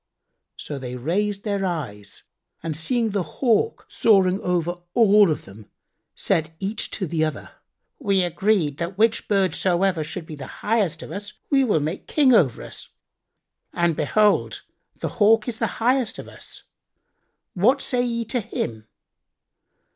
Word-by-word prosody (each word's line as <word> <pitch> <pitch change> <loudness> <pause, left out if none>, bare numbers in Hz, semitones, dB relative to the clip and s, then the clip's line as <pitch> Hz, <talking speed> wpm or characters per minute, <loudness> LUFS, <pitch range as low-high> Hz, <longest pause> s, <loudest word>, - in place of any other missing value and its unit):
So 145 -2 -6
they 125 -1 -6
raised 195 +10 -1
their 200 -2 -1
eyes 125 - -5 0.4
and 160 -2 -3
seeing 225 - 0
the 200 -1 0
Hawk 235 - 0
soaring 195 -3 +3
over 175 -1 0 0.6
them, 105 -2 -14 0.5
said 160 0 0
each 200 +3 -3
to 165 -5 -2
other, 155 -1 -3 0.5
"We 200 -8 +2
agreed 175 -4 +1
that 170 +3 -4
which 225 +1 +2
bird 195 -4 +2
soever 180 -2 +1
should 160 +2 -6
be 160 - -9
the 140 -3 -8 0.2
highest 200 -8 +1
of - - -9
us 205 +1 -6 0.2
we 275 -1 +4
will 205 - +2
make 160 +6 -4
king 275 -4 +4
over 145 - +3
us, - - -8 0.8
and 170 -2 +1
behold, 205 +8 +2 0.4
the - - -2
Hawk 220 +2 +5
is 235 -1 -4
the 225 - +1
highest 245 0 +1
of - - -8
us: - - -12 0.9
what 240 +10 +3
say 250 -2 0
ye 235 -1 -2
to 245 +3 -1
him?" 115 - -5
190 Hz, 145 wpm, -23 LUFS, 160-220 Hz, 0.9 s, Hawk